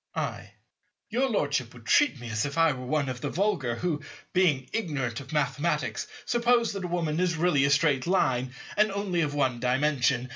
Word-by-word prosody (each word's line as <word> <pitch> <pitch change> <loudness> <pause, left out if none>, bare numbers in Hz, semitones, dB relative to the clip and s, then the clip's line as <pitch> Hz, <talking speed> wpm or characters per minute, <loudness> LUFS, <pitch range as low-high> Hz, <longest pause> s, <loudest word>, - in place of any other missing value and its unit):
I. - - -4 0.6
Your 260 +4 +1
Lordship 145 - -1
would 120 -2 -14
treat 290 - +3
me 120 -2 -7
as 110 0 0
if 145 +1 -4
I 165 -1 +5
were 130 -2 -6
one 145 0 0
of 125 -2 -5
the - - -2
vulgar 175 - 0
who, 155 +1 -2 0.3
being 155 -8 +2
ignorant 145 - -2
of 130 -1 -10
Mathematics, 150 -4 -1 0.2
suppose 240 -1 +2
that 195 -2 -5
a - - -2
Woman 170 -2 -1
is 180 -3 +1
really 155 -5 +3
a - - +2
Straight 145 -1 +2
Line, 130 -8 +1 0.2
and 215 0 +3
only 195 -3 -1
of 145 -2 -1
One 130 -4 +1
Dimension. 125 -1 +1
150 Hz, 190 wpm, -27 LUFS, 130-180 Hz, 0.6 s, I